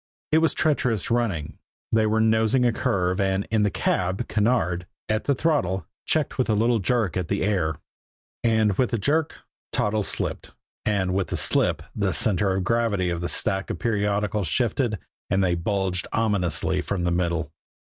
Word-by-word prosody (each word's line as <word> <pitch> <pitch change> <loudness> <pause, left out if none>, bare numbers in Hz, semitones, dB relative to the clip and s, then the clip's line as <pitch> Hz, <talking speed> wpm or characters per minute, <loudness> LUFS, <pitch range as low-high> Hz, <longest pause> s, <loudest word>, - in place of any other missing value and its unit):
It 155 - +5
was 160 0 +2
treacherous 125 - 0
running, 105 -11 -1 0.3
they 110 -1 +3
were 110 +1 +1
nosing 110 +3 +3
a 120 - +3
curve, 95 -6 0
and 95 0 0
in 110 -1 +2
the 105 - +3
cab, 95 0 -1
Kinneard, 105 -5 +1 0.2
at 110 0 -1
the 140 - +2
throttle, 105 - 0 0.2
checked 155 -3 0
with 125 - +1
a 110 - +3
little 115 +2 +2
jerk 110 -1 0
at 90 -3 -1
the 100 +3 -1
"air." 90 -6 0 0.7
And 110 -4 +2
with 125 - +3
the 115 - 0
jerk, 145 +8 0 0.3
Toddles 105 0 0
slipped; - - -4 0.3
and 95 -3 +1
with 95 -1 0
the - - -2
slip, - - +2
the - - 0
center 95 -2 +1
of 95 - -1
gravity 105 -4 +1
of 85 -1 -3
the 85 - -2
stack 95 -3 0
of - - -3
periodicals 105 -2 0
shifted, 115 - 0 0.3
and 95 0 +2
they 90 -2 +2
bulged 95 +1 -1
ominously 90 -5 +1
from 90 -1 -2
the 85 - +1
middle. 85 -3 -1
105 Hz, 175 wpm, -24 LUFS, 90-115 Hz, 0.7 s, It